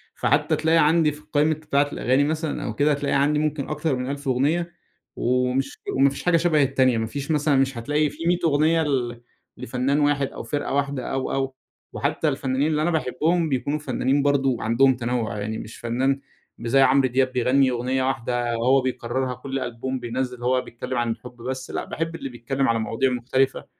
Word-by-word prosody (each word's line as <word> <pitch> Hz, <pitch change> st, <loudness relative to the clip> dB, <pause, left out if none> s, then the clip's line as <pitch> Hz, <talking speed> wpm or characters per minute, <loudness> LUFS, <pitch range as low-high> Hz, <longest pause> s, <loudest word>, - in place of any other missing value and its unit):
فحتّى 150 Hz, +3 st, +2 dB
تلاقي 160 Hz, +2 st, +2 dB
عندي 160 Hz, 0 st, +4 dB
في 150 Hz, -, -12 dB
القايمة 150 Hz, +1 st, +1 dB
بتاعة 145 Hz, -2 st, 0 dB
الأغاني 130 Hz, +3 st, +2 dB
مثلًا 155 Hz, +1 st, -2 dB
أو 110 Hz, -, -3 dB
كده، 145 Hz, +5 st, +3 dB
هتلاقي 145 Hz, -1 st, 0 dB
عندي 145 Hz, +2 st, +2 dB
ممكن 150 Hz, -2 st, -2 dB
أكتر 150 Hz, -1 st, -1 dB
من 125 Hz, +1 st, -3 dB
1000 140 Hz, 0 st, -6 dB
أغنية، 150 Hz, +7 st, +1 dB, 0.4 s
ومش 125 Hz, +2 st, 0 dB, 0.2 s
وما 135 Hz, +1 st, +5 dB
فيش 140 Hz, -, -7 dB
حاجة 175 Hz, -1 st, +4 dB
شبه 160 Hz, -3 st, +3 dB
التانية. 130 Hz, -3 st, +2 dB
ما 110 Hz, 0 st, -1 dB
فيش 140 Hz, +6 st, -4 dB
مثلًا 150 Hz, -1 st, +2 dB
مش 135 Hz, -1 st, +1 dB
هتلاقي 150 Hz, +6 st, +1 dB
في 160 Hz, +4 st, -5 dB
100 175 Hz, 0 st, +3 dB
أغنية 160 Hz, +2 st, +3 dB
ل 120 Hz, -5 st, -2 dB, 0.4 s
لفنان 130 Hz, +5 st, -1 dB
واحد 145 Hz, -1 st, +2 dB
أو -, -, -8 dB
فرقة 145 Hz, -2 st, -3 dB
واحدة 140 Hz, -2 st, -1 dB
أو، 135 Hz, -1 st, -2 dB
أو. 135 Hz, -1 st, -2 dB, 0.4 s
وحتّى 160 Hz, -, -1 dB
الفنّانين 135 Hz, +1 st, 0 dB
اللي 155 Hz, -1 st, 0 dB
أنا 175 Hz, -, +1 dB
باحبهم 160 Hz, +2 st, 0 dB
بيكونوا 140 Hz, +3 st, -1 dB
فنّانين 135 Hz, 0 st, 0 dB
برضه 135 Hz, -3 st, +2 dB
عندهم 125 Hz, +4 st, +3 dB
تنوّع. 120 Hz, -3 st, -2 dB
يعني 110 Hz, +2 st, -3 dB
مش 110 Hz, -, -9 dB
فنّان 130 Hz, +4 st, 0 dB, 0.4 s
مش 115 Hz, -, -5 dB
زي 135 Hz, +3 st, +5 dB
عمرو 135 Hz, 0 st, +5 dB
دياب 130 Hz, +1 st, +1 dB
بيغنّي 130 Hz, +2 st, +3 dB
أغنية 125 Hz, +2 st, -1 dB
واحدة 120 Hz, -2 st, -1 dB
وهو 130 Hz, +3 st, +3 dB
بيكرّرها 130 Hz, 0 st, -2 dB
كل 135 Hz, +2 st, -4 dB
ألبوم 130 Hz, +1 st, -4 dB
بينزّل 125 Hz, 0 st, -4 dB
هو 125 Hz, +1 st, +2 dB
بيتكلّم 125 Hz, +1 st, -6 dB
عن 120 Hz, -1 st, 0 dB
الحب 125 Hz, +2 st, -8 dB
بس 130 Hz, +2 st, -5 dB
لأ، -, -, -3 dB
باحب 165 Hz, +1 st, -4 dB
اللي 135 Hz, -, -5 dB
بيتكلّم 135 Hz, +3 st, -2 dB
على 115 Hz, 0 st, +2 dB
مواضيع 115 Hz, +4 st, 0 dB
مختلفة. 130 Hz, +2 st, 0 dB
135 Hz, 190 wpm, -24 LUFS, 125-150 Hz, 0.4 s, وما